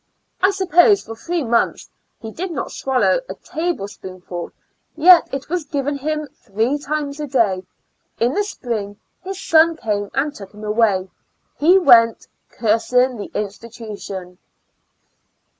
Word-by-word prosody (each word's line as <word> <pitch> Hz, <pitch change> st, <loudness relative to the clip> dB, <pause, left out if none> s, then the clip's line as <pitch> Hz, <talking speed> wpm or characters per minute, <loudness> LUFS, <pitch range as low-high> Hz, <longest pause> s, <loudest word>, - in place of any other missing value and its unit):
I 380 Hz, -, +5 dB
.suppose 385 Hz, +1 st, +4 dB
for 225 Hz, -, -8 dB
three 335 Hz, +7 st, -3 dB
months 235 Hz, -1 st, 0 dB, 0.3 s
he 225 Hz, -, -8 dB
did 365 Hz, -, -5 dB
not 330 Hz, -, -4 dB
swallow 265 Hz, -, +1 dB
a -, -, -5 dB
table 325 Hz, -, -3 dB
spoonful; 185 Hz, -3 st, -8 dB, 0.5 s
yet 345 Hz, +2 st, +7 dB
'it 275 Hz, 0 st, -5 dB
was 350 Hz, +1 st, -2 dB
given 285 Hz, 0 st, -3 dB
him 305 Hz, +2 st, -2 dB
three 230 Hz, +3 st, -2 dB
times 290 Hz, 0 st, -3 dB
a 300 Hz, -, -3 dB
day. 225 Hz, -9 st, +1 dB, 0.6 s
In 240 Hz, +3 st, +2 dB
the 415 Hz, -, +1 dB
spring 220 Hz, -, -5 dB, 0.3 s
his 385 Hz, +1 st, -6 dB
son 330 Hz, -3 st, +4 dB
came 205 Hz, -6 st, -2 dB
and 285 Hz, +2 st, 0 dB
took 200 Hz, -5 st, -12 dB
him 210 Hz, -, -11 dB
away: 210 Hz, -3 st, +1 dB, 0.5 s
he 345 Hz, +6 st, +6 dB
went 235 Hz, -, +5 dB, 0.2 s
cursing 245 Hz, +3 st, +1 dB
the 205 Hz, -, -7 dB
institution. 205 Hz, -4 st, -7 dB
255 Hz, 140 wpm, -20 LUFS, 210-315 Hz, 0.6 s, yet